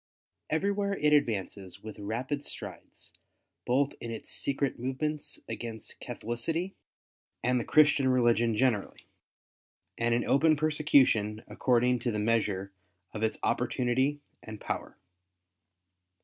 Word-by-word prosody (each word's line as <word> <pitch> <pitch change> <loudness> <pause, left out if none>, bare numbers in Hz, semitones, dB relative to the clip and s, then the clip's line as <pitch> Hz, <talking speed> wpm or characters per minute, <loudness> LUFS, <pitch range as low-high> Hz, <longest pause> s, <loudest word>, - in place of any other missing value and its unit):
Every 190 +6 +1
where 200 -1 -1
it 150 0 +3
advances 100 -8 -1
with 110 -1 -8
rapid 125 +8 -3
strides - - -9 0.5
both 135 +3 +2
in 115 - -5
its 115 -1 -7
secret 140 -2 -2
movements 145 +4 -3
against 115 -2 -7
Catholicity 165 - -3 0.7
and 125 0 +2
the - - -2
Christian 150 -2 +4
religion 120 -3 +3
generally^ 115 -4 0 1.0
and 115 0 +2
in 120 - 0
open 155 +3 +4
persecution 140 -8 +3
according 125 0 +2
to 120 +1 -1
the 105 - -2
measure 105 -3 0 0.4
of 105 - -5
its 110 0 0
opportunity 130 +4 +1 0.2
and 110 -1 -9
power. - - -5
125 Hz, 120 wpm, -30 LUFS, 110-145 Hz, 1.0 s, Christian